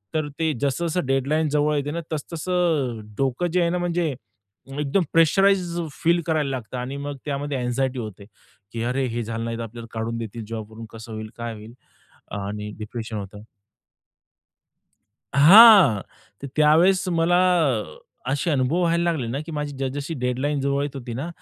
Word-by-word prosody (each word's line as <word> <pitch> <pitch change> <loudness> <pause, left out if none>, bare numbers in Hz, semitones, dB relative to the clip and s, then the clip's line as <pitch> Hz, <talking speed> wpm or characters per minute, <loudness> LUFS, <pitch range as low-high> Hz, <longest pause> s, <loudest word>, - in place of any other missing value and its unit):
तर 155 -1 0
ते 160 -1 +1
जसं-जसं 160 +4 0
डेडलाईन 140 +4 +1
जवळ 150 +1 +1
येते 145 0 -1
ना, 170 +1 -3
तसं-तसं 155 -6 -1
अ, - - -8 0.2
डोकं 135 +6 0
जे 180 - +3
आहे 170 - +2
ना, 180 - 0
म्हणजे 175 -4 -1 0.7
एकदम 150 +6 +1
प्रेशराइज्ड 175 +1 +3 0.2
फील 170 +1 +3
करायला 155 -3 +1
लागतं 125 -2 -5
आणि 130 +3 -4
मग 140 0 -5
त्यामध्ये 145 -1 -2
अँग्झायटी 125 +1 -1
होते, 105 -3 -7 0.5
की 115 -1 -4
अरे 130 +2 0
हे 120 0 -3
झालं 115 +1 -4
नाही, 115 0 -3
तर 115 - -4
आपल्याला 115 +1 -9
काढून 115 +1 -3
देतील 115 0 -6
जॉबवरून. 110 0 -7
कसं 115 +1 -10
होईल 110 0 -6
काय 120 -1 -4
होईल? 110 +2 -11 0.7
आणि 105 +1 -5
डिप्रेशन 110 +1 -6
होतं. 105 +1 -8 1.9
हां. 180 - +9 0.4
तर 140 - -4
त्यावेळेस 165 +5 +4
मला 170 0 +2 0.9
असे 145 +5 0
अनुभव 145 +4 +1
व्हायला 170 0 +2
लागले 140 -8 -2
ना, 125 +5 -3
की 165 - -7
माझी 150 -1 -3
जस 135 -1 -1
जशी 145 +3 -4
डेडलाईन 130 +3 -1
जवळ 140 +1 0
येत 145 -1 -4
होती 120 -3 -6
ना, 135 +8 -4
140 Hz, 165 wpm, -23 LUFS, 115-165 Hz, 1.9 s, हां